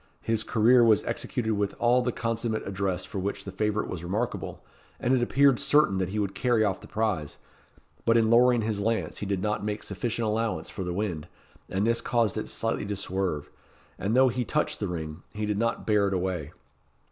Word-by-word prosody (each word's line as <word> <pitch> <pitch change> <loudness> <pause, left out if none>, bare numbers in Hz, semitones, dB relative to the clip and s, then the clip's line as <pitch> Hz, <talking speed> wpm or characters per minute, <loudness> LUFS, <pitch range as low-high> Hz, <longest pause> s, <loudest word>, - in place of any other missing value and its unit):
His 115 -1 0
career 120 +3 +4
was 110 -4 +4
executed 110 -3 -1
with 100 -1 -1
all 120 +1 +3
the 125 0 0
consummate 115 -1 -2
address 95 -2 -2
for 95 - -5
which 100 +1 -3
the 95 - -7
favourite 105 +2 -1
was 85 -2 -5
remarkable, 105 +7 -3 0.3
and 125 - +1
it 130 - +3
appeared 135 +2 +4
certain 140 -8 +3
that 95 -1 -1
he 105 - -4
would 100 -2 -1
carry 120 -4 +2
off 95 -3 0
the - - -12
prize; 105 -10 -2 0.7
but 115 0 +4
in 110 -1 +3
lowering 120 0 +5
his 105 -2 -1
lance 115 +2 -1
he 105 - -4
did 95 -2 -1
not 105 0 -1
make 105 0 -3
sufficient 115 +4 -2
allowance 110 +1 -1
for 95 - -5
the 90 - -3
wind, 90 -5 -3 0.4
and 95 +2 0
this 115 0 +2
caused 115 -3 +1
it 110 - -4
slightly 115 -2 -2
to 105 - -2
swerve, 95 -5 -2 0.5
and 105 +5 0
though 130 0 +6
he 125 +1 -1
touched 110 - -1
the - - -1
ring, 80 -1 -5
he 105 0 -2
did 105 -1 -1
not 115 0 -1
bear 105 -2 +3
it 95 - 0
away. 90 -5 -2
105 Hz, 205 wpm, -27 LUFS, 95-115 Hz, 0.7 s, though